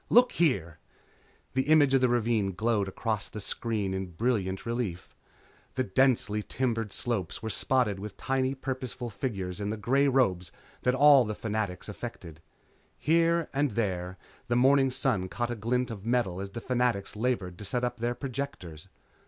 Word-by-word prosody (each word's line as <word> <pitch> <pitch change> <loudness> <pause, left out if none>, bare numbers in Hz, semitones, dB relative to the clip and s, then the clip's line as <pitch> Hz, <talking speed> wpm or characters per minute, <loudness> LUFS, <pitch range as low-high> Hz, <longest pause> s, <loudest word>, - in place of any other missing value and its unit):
Look 245 +1 +6
here 85 - +1 0.4
" - - -34
The 130 +1 0
image 145 -3 +5
of 135 - +4
the 125 - +4
ravine 115 -5 +1
glowed 110 0 +1
across 105 +1 -2
the 105 - -7
screen 105 -1 -2
in 95 0 -3
brilliant 100 -2 -1
relief. 115 -7 -3 0.6
The 130 - +1
densely 110 -1 +2
timbered 115 -2 -2
slopes 110 -6 -2
were 110 - -2
spotted 120 -7 +1
with 105 +1 -7
tiny 135 0 0
purposeful 130 -2 -5
figures 100 -4 -4
in 100 0 -2
the 110 - -2
grey 135 +7 +2
robes 95 -10 +2 0.3
that 125 +1 +2
all 135 -5 +6
Fanatics 105 -3 -3
affected. 100 -7 -8 0.6
Here 165 +1 +2
and 140 -5 0
there 95 -4 -2 0.3
the 120 - +1
morning 135 +2 +5
sun 125 -8 0
caught 120 +4 -2
a - - -2
glint 125 +3 -1
of 100 -4 -7
metal 110 -6 0
as 100 - -5
the 115 +4 -7
Fanatics 125 -6 0
labored 105 -6 -1
to - - -7
set 120 +5 -2
up 125 0 -1
their 120 +1 -1
projectors. 120 - -6
115 Hz, 165 wpm, -29 LUFS, 100-130 Hz, 0.6 s, Look